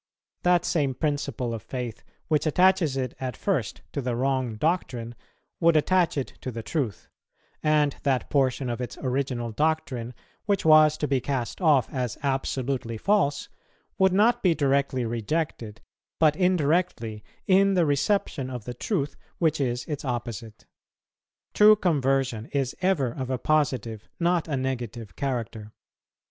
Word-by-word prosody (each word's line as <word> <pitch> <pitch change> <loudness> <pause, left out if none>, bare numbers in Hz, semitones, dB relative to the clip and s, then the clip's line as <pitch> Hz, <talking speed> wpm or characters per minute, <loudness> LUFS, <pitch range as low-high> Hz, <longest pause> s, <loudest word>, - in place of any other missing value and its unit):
That 180 0 +3
same 140 -5 0
principle 140 -5 -2
of 115 - -5
faith 125 -2 -6 0.3
which 155 0 +1
attaches 180 -3 +3
it 130 -2 -2
at 130 -1 -4
first 155 - -2
to 140 - -2
the 125 -2 -2
wrong 130 -2 0
doctrine 125 -5 -1 0.5
would 170 -2 +4
attach 175 +1 +2
it 135 - -3
to - - -4
the 115 -2 -6
truth; 125 - -3 0.5
and 150 -2 +2
that 135 -3 0
portion 135 -2 +1
of 120 +1 -3
its 125 - -5
original 130 -3 -1
doctrine, 130 -4 -1 0.3
which 200 -4 +1
was 155 -1 +6
to 150 - -1
be 135 -2 +1
cast 130 +4 -3
off 145 -9 +4
as 125 -4 -2
absolutely 135 -3 -2
false, 185 - +1 0.5
would 190 0 +5
not 230 +6 +3
be 175 -4 +3
directly 140 -3 +1
rejected, 115 -1 -3 0.4
but 155 -2 +4
indirectly, 160 - 0 0.2
in 195 +1 +4
the 175 -2 +3
reception 145 -2 0
of 125 -4 -6
the 125 - -5
truth 145 - -2 0.2
which 160 -3 +1
is 125 -2 -1
its 150 -4 -5
opposite. 120 -4 -5 0.9
True 210 +1 +7
conversion 135 - 0
is 135 -3 -2
ever 175 -10 +1
of 130 +1 -5
a 130 - 0
positive, 125 -7 -1
not 170 -1 +1
a 145 -4 -1
negative 120 -6 -4
character." 115 -5 -4
135 Hz, 145 wpm, -26 LUFS, 120-160 Hz, 0.9 s, True